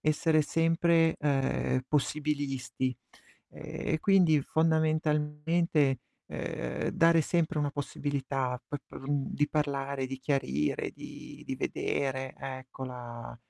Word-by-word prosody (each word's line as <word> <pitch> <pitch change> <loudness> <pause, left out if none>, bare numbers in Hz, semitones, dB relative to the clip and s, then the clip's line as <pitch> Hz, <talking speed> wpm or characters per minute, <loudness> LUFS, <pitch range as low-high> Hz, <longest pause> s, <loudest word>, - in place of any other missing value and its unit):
essere 155 +1 +3
sempre, 165 +1 +3
ehm, 135 -2 +1
possibilisti. 140 -4 -1 0.5
Ehm, - - -12 0.3
e - - +1
quindi 180 -6 +5
fondamentalmente, 155 -1 +2 0.3
ehm, - - -3
dare 165 0 +5
sempre 160 0 +1
una 145 -1 +1
possibilità 135 -3 -2
pe 145 - -4
per - - -10
mhmm, 140 0 -1
di 145 +1 +2
parlare, 140 -3 -1
di 135 0 -5
chiarire, 75 - 0
di - - -10
di - - -3
vedere, 130 -1 -1
ecco, 130 0 -6
la 120 -2 -7
145 Hz, 110 wpm, -30 LUFS, 135-155 Hz, 0.5 s, quindi